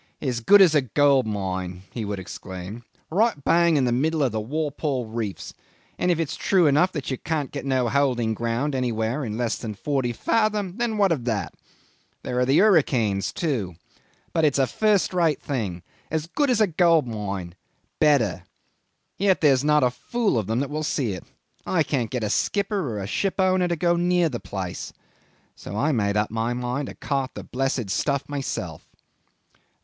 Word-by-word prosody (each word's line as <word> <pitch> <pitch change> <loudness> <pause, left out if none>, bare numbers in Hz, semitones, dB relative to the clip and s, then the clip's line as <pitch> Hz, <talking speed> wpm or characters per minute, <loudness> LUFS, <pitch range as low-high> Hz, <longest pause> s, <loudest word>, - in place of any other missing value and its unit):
"As 125 -4 -2
good 200 - +7
as 170 -4 +4
a 150 - +4
gold 135 0 +3
mine," 95 -3 -3
he 115 -3 -4
would 100 0 -3
exclaim. 95 +3 -8 0.3
"Right 220 +6 +3
bang 170 0 +4
in 135 - +2
the 120 - +1
middle 155 +5 +1
of 130 - +1
the 110 0 -2
Walpole 145 0 -2
Reefs, 110 -3 -5 0.5
and 180 - +1
if 170 -2 +2
it's 165 -4 -2
true 185 -4 +2
enough 150 +6 +4
that 145 -3 -4
you 130 - -3
can 155 -3 -1
get 140 +1 -7
no 130 -2 +1
holding 120 -3 +1
ground 120 +6 -1
anywhere 120 +1 -1
in 110 -3 -4
less 120 -2 -1
than 110 -3 -5
forty 130 +1 -1
fathom, 210 - 0
then 235 -2 -1
what 200 -3 +3
of 135 -8 -1
that? 110 -5 -2 0.7
There 125 - -2
are 125 - +2
the 135 - +4
hurricanes, 130 - +3
too. 115 - -2 0.6
But 165 - +1
it's 145 -3 +3
a 135 - +4
first 210 - +1
rate 165 -5 +2
thing. 100 - -4 0.3
As 160 -1 -1
good 280 - 0
as 245 - +2
a - - +6
gold 170 -3 +3
mine 100 -6 -5 0.5
better! 140 - +3 0.8
Yet 195 -1 +2
there's 140 -4 +4
not 150 -1 +4
a 125 - +3
fool 225 - -1
of 100 - -4
them 115 +3 0
that 140 - -3
will 155 +1 -2
see 140 -6 -1
it. 90 - -7 0.4
I 165 -4 +1
can't 125 -7 -1
get 125 -3 -3
a 105 - -1
skipper 200 - 0
or 110 - -4
a 95 - -4
shipowner 185 - +1
to 170 - 0
go 170 +1 +2
near 175 -1 +2
the 120 -4 -4
place. 95 -3 -6 0.6
So 100 - -7
I 145 +7 +2
made 105 -5 +1
up 105 0 0
my 115 +2 -1
mind 125 +3 -2
to - - -8
cart 135 -2 -2
the - - -6
blessed 130 -5 -2
stuff 140 +5 0
myself." 130 - -5
135 Hz, 190 wpm, -24 LUFS, 110-165 Hz, 0.8 s, good